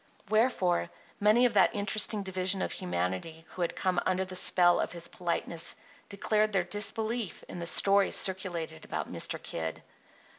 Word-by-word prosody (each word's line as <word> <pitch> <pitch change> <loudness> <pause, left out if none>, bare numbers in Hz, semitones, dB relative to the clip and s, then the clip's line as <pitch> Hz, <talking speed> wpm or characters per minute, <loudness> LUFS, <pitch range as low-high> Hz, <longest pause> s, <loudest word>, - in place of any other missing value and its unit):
Wherefore 215 - +1 0.3
many 215 +4 +4
of 240 - +1
that 205 - +4
interesting 205 +1 0
division 190 0 -1
of - - -3
humanity 95 - -4
who 185 - -8
had 170 - -1
come 185 -2 0
under 185 0 0
the 185 0 -8
spell 175 -1 +5
of - - -2
his 170 -1 -5
politeness 170 -1 -3 0.3
declared 215 +1 0
their 190 -2 +2
disbelief 215 +3 0
in 175 - -8
the 170 - -4
stories 200 +2 +4
circulated 180 - 0
about - - -5
Mr. - - -2
Kid. 80 -1 -5
185 Hz, 155 wpm, -29 LUFS, 170-205 Hz, 0.3 s, spell